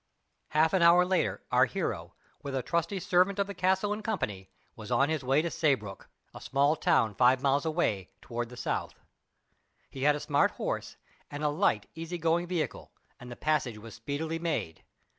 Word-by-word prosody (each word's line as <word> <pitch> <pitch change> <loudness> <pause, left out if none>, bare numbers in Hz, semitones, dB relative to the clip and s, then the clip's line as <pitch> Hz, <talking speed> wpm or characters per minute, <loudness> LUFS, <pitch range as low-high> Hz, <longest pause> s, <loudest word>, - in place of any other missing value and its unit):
Half 160 +3 +2
an 190 - +3
hour 170 +1 +6
later, 185 0 0
our - - +5
hero, - - -4 0.3
with 140 -1 -5
a 130 - -1
trusty 170 - -1
servant 185 +2 +2
of 200 - +1
the 200 - -7
castle 190 +2 +1
in 210 - -5
company, 105 - -3 0.3
was 110 -1 -9
on 135 +4 +3
his 160 -3 -1
way 135 +4 +2
to 170 - -2
Saybrook, 120 -11 -1 0.2
a - - -10
small 140 +3 +2
town 110 -7 +2
five 125 +4 +3
miles 140 +3 +2
away 110 - 0
toward 120 -1 -5
the 125 - -11
south. 120 - -3 1.0
He 135 - -8
had 145 +1 +4
a - - -4
smart - - +2
horse, - - -4 0.3
and 145 +1 -6
a 150 - +3
light, 145 - +1
easy 165 +2 -5
going 170 +1 +1
vehicle, 175 -3 -3 0.3
and 125 - -10
the - - -6
passage 140 -7 0
was 110 +1 -11
speedily 160 +3 -4
made. 160 - -3
150 Hz, 185 wpm, -29 LUFS, 125-170 Hz, 1.0 s, hour